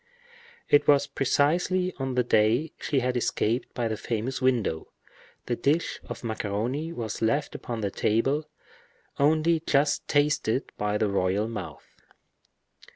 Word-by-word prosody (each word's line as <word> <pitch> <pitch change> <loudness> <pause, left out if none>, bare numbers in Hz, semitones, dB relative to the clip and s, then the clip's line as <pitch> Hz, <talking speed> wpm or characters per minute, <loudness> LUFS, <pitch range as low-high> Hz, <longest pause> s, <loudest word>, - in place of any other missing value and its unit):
It 145 - +4
was 145 -1 +5
precisely 170 +7 +1
on 135 -1 -2
the 125 - +3
day 120 +7 +2
she 135 -3 0
had 125 0 -1
escaped 120 0 0
by 120 -2 0
the 110 - -2
famous 115 +5 -3
window. 120 -11 +1 0.6
The 120 - -1
dish 150 +7 0
of - - -8
macaroni 115 +8 -2
was 115 -9 -5
left 140 +6 0
upon 115 -2 -5
the 100 -2 -1
table, 135 +11 0 0.7
only 155 +3 +3
just 150 -1 +1
tasted 145 -4 +1
by 105 0 -1
the 110 - +1
royal 100 +2 0
mouth. 100 -9 -7
125 Hz, 135 wpm, -27 LUFS, 110-145 Hz, 0.7 s, was